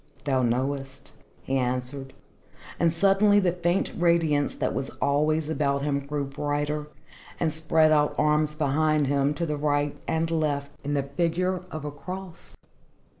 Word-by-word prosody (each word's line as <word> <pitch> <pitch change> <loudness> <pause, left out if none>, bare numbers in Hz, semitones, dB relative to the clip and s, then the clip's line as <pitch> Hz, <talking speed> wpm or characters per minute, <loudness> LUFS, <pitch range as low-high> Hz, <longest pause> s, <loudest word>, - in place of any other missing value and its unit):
"Thou 135 -3 +1
knowest," 130 +3 -2 0.3
he 135 - -1
answered. 130 +2 -3 0.7
And 170 -1 +3
suddenly 200 +4 +4
the 185 -3 +2
faint 175 +1 0
radiance 165 -4 +2
that - - -1
was 135 0 -2
always 150 +2 +1
about 140 -3 0
him 140 -1 0
grew 140 0 -3
brighter, 145 +2 -2 0.5
and 160 -3 +1
spread 160 0 +3
out 150 -1 +3
arms 150 0 +2
behind 155 0 +2
him, 140 +1 +1
to 170 - -2
the 150 -2 -2
right 145 0 0
and 165 0 0
left, 145 -3 -1
in 145 +1 -1
the 140 - +1
figure 175 +6 -1
of 155 -3 -6
a 150 - -3
cross. 180 +4 -9
150 Hz, 150 wpm, -26 LUFS, 140-165 Hz, 0.7 s, suddenly